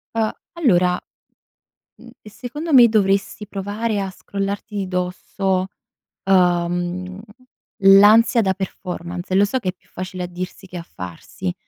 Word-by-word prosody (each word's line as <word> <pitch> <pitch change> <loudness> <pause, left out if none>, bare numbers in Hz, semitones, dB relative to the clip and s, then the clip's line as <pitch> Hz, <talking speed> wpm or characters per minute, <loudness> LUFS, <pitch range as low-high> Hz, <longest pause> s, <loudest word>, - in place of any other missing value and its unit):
Uhm, 220 -1 +1 0.2
allora, 185 - +3 1.0
mhmm, - - -14
ehm, 210 - -13
secondo 295 +9 -5
me, 245 -3 +9
dovresti 205 -1 0
provare 205 +2 -3
a 195 -1 -2
scrollarti 200 +3 -5
di 195 -2 -2
dosso, 185 +1 -2 0.6
uhm, 180 0 +1 0.6
l'ansia 210 +5 +7
da 190 -3 +1
performance. 180 -1 -5
Lo 195 - +5
so 260 +6 -1
che 190 - -2
è - - -3
più 185 - -33
facile 185 0 -6
a - - -4
dirsi 180 +2 -7
che 180 - -8
a 170 - -6
farsi. 90 - -7
195 Hz, 140 wpm, -21 LUFS, 180-210 Hz, 1.0 s, me